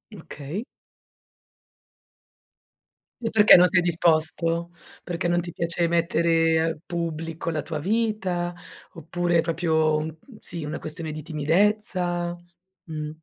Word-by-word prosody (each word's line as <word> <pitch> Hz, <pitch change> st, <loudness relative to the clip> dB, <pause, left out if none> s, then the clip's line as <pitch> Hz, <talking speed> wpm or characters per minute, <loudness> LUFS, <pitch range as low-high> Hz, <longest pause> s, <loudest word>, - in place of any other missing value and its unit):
Okay. 160 Hz, -, -7 dB, 2.6 s
E 225 Hz, -1 st, -2 dB
perché 210 Hz, -1 st, +8 dB
non 180 Hz, -, +7 dB
sei 180 Hz, +1 st, +3 dB
disposto? 165 Hz, 0 st, +1 dB, 0.3 s
Perché 175 Hz, -1 st, -2 dB
non 175 Hz, 0 st, +2 dB
ti 175 Hz, 0 st, -7 dB
piace 170 Hz, +1 st, 0 dB
mettere 165 Hz, -1 st, +2 dB
al 165 Hz, -1 st, -1 dB
pubblico 165 Hz, -1 st, -4 dB
la 155 Hz, -2 st, -2 dB
tua 155 Hz, -, -4 dB
vita? 190 Hz, -2 st, -1 dB, 0.4 s
Oppure 175 Hz, +2 st, 0 dB
è -, -, +5 dB
proprio 160 Hz, -2 st, +1 dB
un 155 Hz, +1 st, -3 dB, 0.2 s
sì, 170 Hz, -2 st, -6 dB
una 150 Hz, +2 st, -4 dB
questione 160 Hz, 0 st, -6 dB
di 155 Hz, 0 st, -7 dB
timidezza? 175 Hz, +2 st, 0 dB, 0.5 s
Mh. 155 Hz, -2 st, -5 dB
170 Hz, 120 wpm, -25 LUFS, 160-175 Hz, 2.6 s, perché